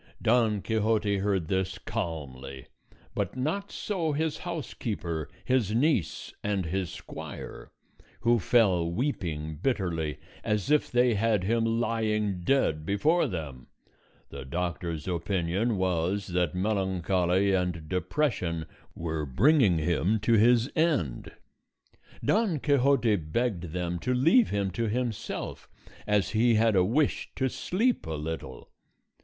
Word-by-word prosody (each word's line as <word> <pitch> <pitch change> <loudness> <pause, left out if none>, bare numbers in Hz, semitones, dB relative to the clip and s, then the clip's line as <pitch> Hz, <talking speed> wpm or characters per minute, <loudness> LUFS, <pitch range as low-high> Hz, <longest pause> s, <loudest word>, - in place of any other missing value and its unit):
Don 110 -3 +2
Quixote 110 -2 +1
heard 95 -4 0
this 95 0 -1
calmly; 70 -5 -5 0.5
but 100 +3 -2
not 180 +10 -2
so 170 -7 -2
his 155 +1 -1
housekeeper, 105 - -4 0.2
his 120 -5 +1
niece, 125 - 0
and 100 -3 0
his 90 +1 -2
squire, - - -8 0.5
who 120 0 +3
fell 95 -5 +3
weeping 80 - -2
bitterly, 85 - -1 0.3
as 105 +4 -1
if 150 - +3
they 125 -1 +4
had 105 -2 +1
him 115 +3 +1
lying 110 -4 0
dead 85 - +1
before 145 - +2
them. 75 -8 -6 0.6
The - - -7
doctor's 85 +1 -3
opinion 95 +4 0
was 95 +2 0
that 90 -2 0
melancholy 95 -1 +1
and 90 -4 -1
depression 90 - -1 0.3
were 80 -2 -3
bringing 105 - +4
him 90 +6 +1
to 115 +2 +2
his 115 +2 +5
end. 150 - 0 0.9
Don 205 -8 +2
Quixote 135 -6 +3
begged 90 +3 -2
them 90 0 -2
to 125 +5 0
leave 165 - +5
him 100 -2 -1
to 115 +5 -1
himself, 120 -1 -4 0.4
as 105 -2 +2
he 115 +1 +3
had 110 -1 +3
a 90 - +5
wish 130 +10 +1
to 130 - +1
sleep 220 - 0
a 80 - -3
little. 80 +2 -6
100 Hz, 125 wpm, -28 LUFS, 85-120 Hz, 0.9 s, his